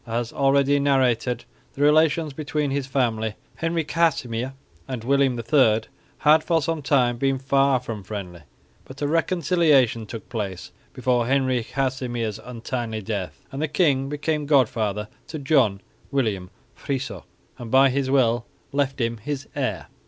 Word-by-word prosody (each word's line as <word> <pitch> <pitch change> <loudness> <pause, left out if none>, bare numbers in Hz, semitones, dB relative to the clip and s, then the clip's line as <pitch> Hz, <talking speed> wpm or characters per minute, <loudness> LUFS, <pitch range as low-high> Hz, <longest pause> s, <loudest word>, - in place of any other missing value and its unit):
As 115 0 -2
already 140 +1 +3
narrated, 125 -4 +1 0.3
the 140 - 0
relations 155 0 +3
between 150 0 -2
his 140 -1 -2
father, 115 -5 0 0.2
Henry 165 0 0
Casimir, 130 -7 0 0.3
and 125 -4 -5
William 135 0 +2
III 115 -2 +3 0.4
had 155 +1 +5
for 165 -2 +2
a 165 -2 -1
time 125 -4 +2
been 135 +1 +1
far 135 0 +2
from 115 -4 -6
friendly; 95 -4 -7 0.4
but 135 +2 -9
a - - +1
reconciliation 155 - +2
took 115 +1 -8
place 105 -7 -5 0.2
before 125 -2 0
Henry 130 -2 +1
Casimir's 125 -4 -2
untimely 120 -2 -5
death, 100 -4 -5
and 135 - -5
the 155 - +1
king 140 -4 +2
became 150 0 -2
god 140 -5 +5
father 105 -2 -2 0.2
to 155 - -6
John 135 -9 +2 0.3
William 105 -10 -1 0.3
Friso, 130 - -4 0.4
and 120 -2 -7
by 135 +2 +5
his 135 0 -1
will 120 -4 +2 0.3
left 140 -1 0
him 115 -1 -1
his 140 +5 -5
heir. 110 - -2
130 Hz, 145 wpm, -24 LUFS, 115-140 Hz, 0.4 s, had